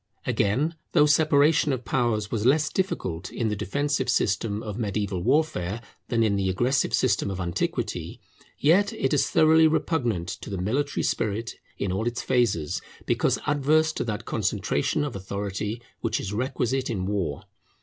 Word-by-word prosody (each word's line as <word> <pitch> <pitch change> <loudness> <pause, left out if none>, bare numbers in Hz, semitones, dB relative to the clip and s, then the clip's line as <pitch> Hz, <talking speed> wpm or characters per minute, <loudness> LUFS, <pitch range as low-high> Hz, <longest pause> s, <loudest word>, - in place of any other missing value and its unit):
Again, 130 +11 +1 0.2
though 150 -3 +6
separation 150 0 +4
of 125 -3 -3
powers 110 -5 0
was 110 -3 -1
less 150 +5 +3
difficult 95 - -2
in 115 -2 -1
the 105 - -1
defensive 140 +7 -1
system 105 +1 0
of 105 +1 -5
mediaeval 100 -4 -2
warfare 105 - +1 0.3
than 115 -1 +1
in 100 -2 +2
the 95 -1 0
aggressive 125 +8 +1
system - - +1
of 95 -1 -4
antiquity, 85 0 -3 0.4
yet 190 +7 +4
it 135 - -1
is 145 - +2
thoroughly 160 0 +5
repugnant 120 - 0
to - - -7
the 100 - -3
military 130 +11 -1
spirit 110 +1 -1 0.2
in 100 - -2
all 95 +5 -1
its 120 0 -2
phases, 115 - +1 0.2
because - - +1
adverse 150 +2 +3
to - - -2
that 105 -3 -4
concentration 110 - 0
of 145 - -4
authority 100 +3 -4 0.2
which - - -1
is 100 - -4
requisite 130 +2 -1
in 95 -6 -2
war. 95 -8 -2
115 Hz, 160 wpm, -26 LUFS, 100-145 Hz, 0.4 s, though